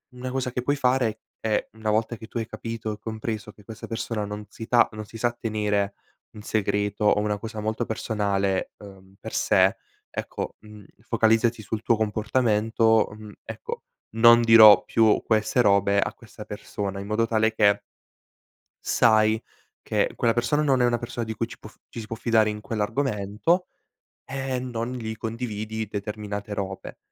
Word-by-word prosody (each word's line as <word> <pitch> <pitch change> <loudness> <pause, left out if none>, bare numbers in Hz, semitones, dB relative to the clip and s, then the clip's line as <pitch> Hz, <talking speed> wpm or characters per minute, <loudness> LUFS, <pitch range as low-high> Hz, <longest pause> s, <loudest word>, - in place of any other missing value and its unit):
Una 125 +1 -5
cosa 130 -1 -2
che 125 - -2
puoi 145 +3 +1
fare 125 -5 +1 0.2
è, 110 -1 0
una 110 -1 -2
volta 110 +2 0
che 110 - -10
tu 120 - -6
hai 115 - -3
capito 115 -1 -5
e - - -8
compreso 110 -1 -5
che 105 - -19
questa 110 +1 -9
persona 115 -2 -3
non 105 +1 -6
si 115 - -8
sa 120 -1 +5
non 110 0 -6
si 115 - -11
sa 120 +1 +1
tenere 105 -2 0 0.4
un 105 - -10
segreto 105 -1 -1
o 105 - +4
una 105 0 0
cosa 110 +1 -7
molto 110 +2 -2
personale, 100 -3 -1
uhm, 95 -1 -14
per - - -8
sé - - +3 0.4
ecco, - - -5
mhmm, 105 -1 -14 0.2
focalizzati 115 0 +2
sul 105 +2 -4
tuo 115 - +3
comportamento, 110 0 +2
mhmm, 105 -1 -10
ecco: - - -7 0.3
"Non 115 +1 +7
dirò 110 -3 +9
più 110 -2 +3
queste 110 +2 +2
robe 100 -1 +3
a - - -1
questa - - -12
persona", 100 -1 -5
in 100 - -6
modo 115 +2 +1
tale 110 -1 +2
che 100 -2 +3 1.0
sai 110 -1 +3 0.4
che - - 0
quella 115 -1 +2
persona 120 +5 +1
non 135 -4 +3
è - - +5
una 120 0 +2
persona 120 0 -5
di 110 - -4
cui 115 +1 -2
ci - - -12
può 105 - -11 0.2
ci 115 - -8
si 110 - -7
può 115 - -4
fidare 110 -1 +2
in 105 0 -5
quell'argomento, 115 - -1 0.6
e, 135 +1 -6 0.2
ehm, 125 0 -3
non 115 +1 -3
gli 110 -3 -5
condividi 110 -1 -4
determinate 105 0 -5
robe. 95 -1 -5
110 Hz, 175 wpm, -25 LUFS, 105-115 Hz, 1.0 s, dirò